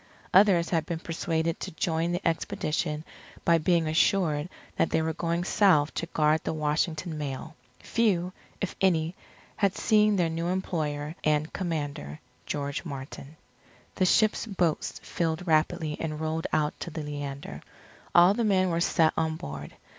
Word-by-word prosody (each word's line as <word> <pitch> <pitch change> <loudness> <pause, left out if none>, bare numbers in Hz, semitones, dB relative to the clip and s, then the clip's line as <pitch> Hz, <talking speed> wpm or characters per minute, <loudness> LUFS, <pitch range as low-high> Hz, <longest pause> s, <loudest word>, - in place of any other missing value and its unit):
Others 185 -3 +5
had 160 -3 +1
been 170 - -2
persuaded 165 0 -2
to - - -4
join 165 +1 -1
the 175 +2 -1
expedition 165 -3 -1 0.4
by 170 -1 +5
being 165 0 +2
assured 160 -1 +2 0.3
that - - +2
they - - +2
were 160 0 -1
going 170 +2 -1
south 175 -6 +3
to 170 - -3
guard 155 -1 +2
the - - -2
Washington 155 +2 -1
mail. 145 +2 -5 0.3
Few, 185 -6 +1 0.3
if 195 - -3
any, 170 -3 +2 0.4
had 200 -2 +2
seen 215 -1 +4
their 175 -3 +2
new 165 +1 -2
employer 155 -5 -2
and 155 0 +1
commander, 145 - -4 0.3
George 140 -1 -3
Martin. 140 0 -8 0.6
The 185 - +2
ship's 215 +4 +3
boats 180 -6 -1
filled 165 +1 -2
rapidly 155 -1 +1
and 155 -2 -3
rowed 160 +1 -2
out 150 -1 +1
to - - -5
the 160 -1 -5
Leander. 140 - -6 0.5
All 175 +3 +8
the 235 - -1
men 185 -4 +3
were 165 0 0
set 165 -2 +3
on 160 -1 0
board. 75 - -7
160 Hz, 155 wpm, -28 LUFS, 150-180 Hz, 0.6 s, All